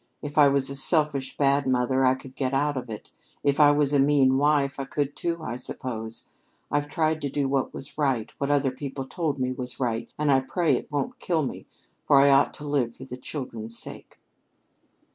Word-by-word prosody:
If 145 0 -6
I 145 -2 +7
was 140 -1 +2
a - - -5
selfish, 140 -1 0
bad 140 0 +2
mother, 130 +1 +2
I 130 0 +4
could 130 0 -12
get 135 -1 -1
out 145 +1 +1
of 125 -2 -5
it; 110 -2 -8 0.3
if 140 0 +1
I 150 -1 +8
was 145 -1 +2
a 140 - +4
mean 135 -2 +4
wife, 145 -1 +2
I 135 - -2
could, 145 +1 -2
too, 170 -1 -3
I 120 -4 -4
suppose. 115 -3 -6 0.4
I've 145 0 0
tried 155 0 0
to 140 - -2
do 140 0 -1
what 135 -1 0
was 140 +3 -9
right, 135 -7 0
what 140 - -1
other 140 -2 +2
people 135 0 -6
told 155 0 -2
me 130 -1 -1
was 125 -1 -5
right, 115 -2 -2
and 150 -1 +2
I 135 - +5
pray 155 +3 +1
it - - -5
won't 240 - -2
kill 165 -8 0
me - - -7 0.4
for 140 - +6
I 140 0 +6
ought 135 0 +4
to 150 - -8
live 130 -5 0
for 130 - -10
the 125 - -7
children's 115 -4 -7
sake." - - -10
140 Hz, 215 wpm, -26 LUFS, 130-145 Hz, 0.4 s, I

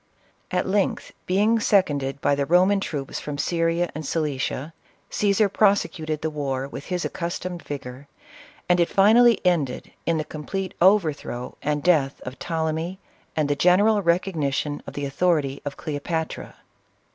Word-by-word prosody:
At 180 0 0
length, 200 0 0 0.2
being 210 +5 +3
sec 200 -3 +4
onded 140 -1 -4
by - - +2
the 140 0 0
Roman 185 +4 +4
troops 145 -8 -4
from 150 -1 -5
Syria 165 +3 0
and 155 - -5
Cilicia, 150 0 -2 0.4
Caesar 205 +1 +2
prosecuted 185 -7 +1
the 160 - 0
war 135 -3 -2
with 140 0 -8
his 180 -1 -2
accustomed 175 0 -4
vigor, 135 -1 -7 0.6
and 180 0 +3
it 170 - +3
finally 225 +3 +5
ended 155 -8 0 0.2
in 165 -1 +2
the 155 - -1
complete 185 +6 -5
overthrow 160 -10 +2
and 150 -1 -1
death 155 -6 +2
of 125 +1 -8
Ptolemy, 160 +2 -2 0.4
and 155 -2 +1
the 145 - +1
general 200 +7 +4
recognition 160 -5 0
of - - -8
the 145 - -3
authority 140 -2 0
of 140 -1 -5
Cleopatra. 160 +2 -4
160 Hz, 145 wpm, -24 LUFS, 145-185 Hz, 0.6 s, finally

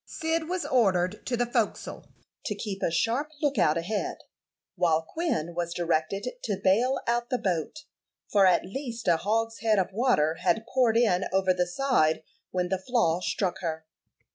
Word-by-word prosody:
Cyd 320 0 -2
was 365 -1 -2
ordered 190 -5 +1
to 245 - 0
the 245 - +1
forecastle 235 -3 -2 0.4
to - - -2
keep 195 -3 -5
a - - +1
sharp 230 - 0
lookout 205 - +2
ahead, 195 +6 -2 0.6
while 165 -2 +2
Quin 175 - -2
was 170 0 -3
directed 170 +3 -1 0.2
to - - -1
bale 215 +8 +2
out 240 +1 0
the 255 - +1
boat, 185 - -2 0.5
for 200 -2 +4
at 180 -1 +3
least 235 +2 -6
a 170 -2 +5
hogshead 225 +2 0
of 190 -1 +1
water 165 - +2
had 190 +5 +1
poured 240 -4 +3
in 195 -6 +3
over 190 -1 +3
the 180 -1 0
side 175 - +1 0.3
when 180 -1 -1
the 190 0 0
flaw 190 -6 +1
struck 185 0 -1
her. 160 -3 -4
195 Hz, 165 wpm, -27 LUFS, 175-240 Hz, 0.6 s, a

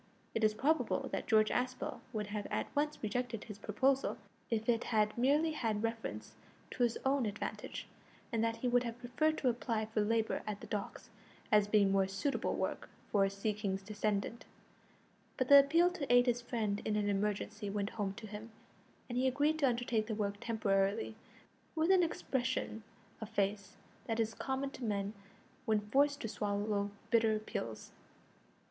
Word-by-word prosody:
It 225 - -1
is 215 0 +4
probable 270 0 +1
that - - -3
George 215 -1 +4
Aspel 255 +1 -2
would 215 -3 -2
have 210 -1 -3
at - - -3
once 295 +1 +1
rejected 230 +1 -2
his 210 -3 -9
proposal 265 +7 +1 0.3
if 225 -1 -1
it 235 -1 +2
had 215 -2 +2
merely 290 +6 +3
had 225 -8 -1
reference 225 - -3 0.4
to - - -5
his 235 -1 +3
own 265 -3 +2
advantage, 205 +1 -5 0.4
and 225 -1 +1
that 230 0 +1
he 230 +2 -2
would 245 0 +4
have 235 -1 -4
preferred 250 +6 0
to 255 - +2
apply 230 -2 -1
for 220 0 -1
labour 220 +1 +1
at 210 -1 -3
the - - -9
docks, 205 -2 -5 0.4
as 210 -1 +5
being 205 -2 +4
more 195 -1 +3
suitable 195 +9 -1
work - - -3 0.2
for 200 -2 +4
a - - +1
sea 200 +2 -1
king's 195 -2 -3
descendant; 210 +2 -2 0.9
but 255 -2 0
the 280 0 +11
appeal 330 +6 +4
to 295 -8 -3
aid 245 0 +7
his 245 -1 +1
friend 220 -4 -1
in 215 - 0
an 210 -1 +1
emergency 205 +1 -1
went 200 +1 -2
home 200 -3 -2
to 235 - -8
him, 215 +2 -8 0.6
and 245 0 -2
he 260 - +3
agreed 290 +4 +2
to 275 -3 +4
undertake 235 -2 0
the 220 - -2
work 205 -1 -1
temporarily, 195 - +1 0.6
with 320 +3 +3
an 375 -1 +6
expression 255 -8 -1 0.4
of 220 - -5
face 200 -1 -1 0.3
that 225 0 -1
is 225 0 +1
common 270 +2 -2
to 260 - -9
men 205 -2 -1 0.5
when 220 -3 +3
forced 280 +7 +2
to - - -2
swallow 205 -1 -1 0.2
bitter 225 -2 +4
pills. 115 - -5
225 Hz, 175 wpm, -34 LUFS, 210-250 Hz, 0.9 s, the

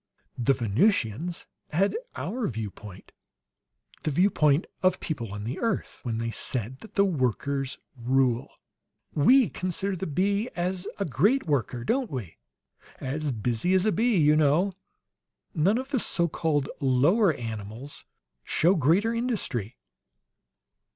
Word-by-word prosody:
"The 135 +3 +3
Venusians 135 - 0 0.2
had 190 +6 +1 0.2
our 245 -2 -2
viewpoint 105 -4 -7 0.9
the - - -1
viewpoint 150 -2 +3 0.2
of 185 0 +3
people 120 -10 -4
on 105 0 -5
the 120 +6 -4
earth, 230 -4 -2
when 115 -3 -3
they 115 0 -2
said 125 +2 -2
that 220 - -14
the 200 - +5
workers 135 - -1 0.2
rule. 125 0 +1 0.6
We 245 - +5
consider 185 +2 -2
the 185 +2 -4
bee 200 - 0
as 180 +2 -2
a 200 - -1
great 195 - +2
worker, 130 -5 -1
don't 250 - 0
we? 120 - -6 0.6
'As 145 +2 -2
busy 120 - 0
as 185 +1 +3
a 215 - +3
bee,' 230 -1 +2
you 150 -2 +5
know. 155 +6 +3 0.8
None 185 +8 +3
of 265 +2 -5
the 265 - +2
so 170 -5 +1
called 150 -4 0
lower 150 - +4
animals 110 +4 -7 0.4
show 175 +4 +3
greater 185 - +2
industry." 215 - -2
150 Hz, 130 wpm, -27 LUFS, 125-195 Hz, 0.9 s, the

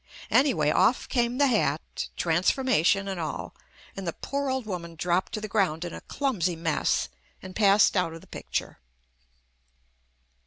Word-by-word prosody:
Anyway 170 - +3
off 190 +10 +3
came 240 0 0
hat, 220 - +1
transformation, 185 - +2
and 190 -2 -3
all, 155 -3 -4 0.4
and 195 -2 -6
the 170 - -1
poor 280 0 -3
old 260 -2 -1
woman 170 -5 -5
dropped 175 +4 0
to 225 - -3
the 215 - -5
ground 185 -6 0
in 175 - -6
a - - -8
clumsy 195 - -1
mess 165 -1 0 0.3
and 185 0 -10
passed 205 -1 +5
out 180 -3 +1
of 165 0 -9
the - - -16
picture. - - -5
190 Hz, 150 wpm, -27 LUFS, 170-235 Hz, 0.4 s, passed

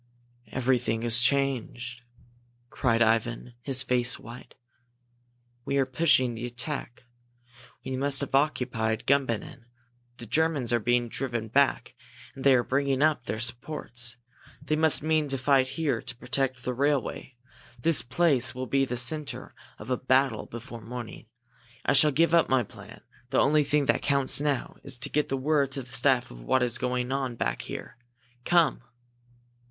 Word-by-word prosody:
"Everything 125 -3 0
has 120 0 +4
changed!" 120 -2 0 0.7
cried 115 -2 +2
Ivan, 115 +2 0
his 130 0 +2
face 125 -1 +1
white. 120 +2 -12 1.1
"We 140 - -1
are 135 - +3
pushing 130 -2 +3
the 115 +2 -5
attack 125 +1 -6 0.8
we 130 - -3
must 135 +1 +2
have 140 - -5
occupied 125 -6 0
Gumbinnen! 130 -2 -1 0.5
The 120 - -9
Germans 140 -1 +1
are 120 - +3
being 120 +2 +1
driven 120 -2 -3
back 140 +4 +2 0.4
and 135 - -9
they 135 -1 +6
are 120 - +2
bringing 140 +1 0
up 150 -5 +1
their 110 - -3
supports! 120 0 -4 0.4
They 155 +2 -1
must 155 -1 +2
mean 155 -1 +1
to 135 - -1
fight 130 0 +3
here 145 -8 0
to 120 0 -8
protect 130 -1 -2
the 125 - -2
railway! 135 -1 -1 0.4
This 165 -2 +5
place 130 -2 +1
will 130 0 -4
be 135 +1 +1
the 125 -1 -4
centre 150 +5 0 0.2
of 105 +4 -8
a 125 - +1
battle 130 -2 +1
before 120 0 -9
morning! 115 -1 -8 0.6
I - - +3
shall 150 +2 +7
give 165 +4 +2
up 170 - +4
my 130 -2 +3
plan. - - -13 0.3
The - - 0
only 150 +2 +4
thing 145 0 +1
that - - +1
counts 140 -1 0
now 145 -3 -2
is 125 - -5
to 135 +3 -4
get 150 -1 -1
word 140 +1 +1
to 135 - -4
the 125 - -11
staff 125 -1 +2
of - - -11
what 130 - +1
is 120 -2 0
going 125 0 -2
on 135 -3 -2
back - - -2
here! 120 - -8 0.5
Come!" 170 -6 +3
130 Hz, 160 wpm, -27 LUFS, 120-140 Hz, 1.1 s, shall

